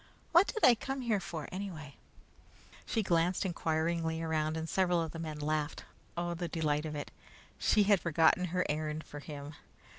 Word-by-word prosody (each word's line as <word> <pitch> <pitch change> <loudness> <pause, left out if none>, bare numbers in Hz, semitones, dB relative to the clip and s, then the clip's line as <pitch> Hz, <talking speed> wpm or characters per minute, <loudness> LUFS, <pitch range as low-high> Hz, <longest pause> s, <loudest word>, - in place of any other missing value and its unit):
What 345 +4 +6
did 440 - -4
I 245 - +9
come 270 +3 -4
here 225 -5 +1
for 165 -4 -6
anyway?" 175 -7 -6 0.9
She 225 - 0
glanced 175 +1 +2
inquiringly 165 -1 0
around, 160 -1 0
and 160 0 -3
several 180 -1 +2
of 165 -2 -2
the 165 - -7
men 155 -2 -4
laughed. 150 0 -2 0.3
Oh, 175 0 -1
the 170 0 -3
delight 155 -2 0
of 150 - -5
it! 145 - -5 0.5
She 210 - +4
had 200 -1 +4
forgotten 165 +2 +3
her 180 +1 0
errand 155 +1 -2
for 145 - -9
him! 145 0 -8
165 Hz, 175 wpm, -32 LUFS, 155-180 Hz, 0.9 s, I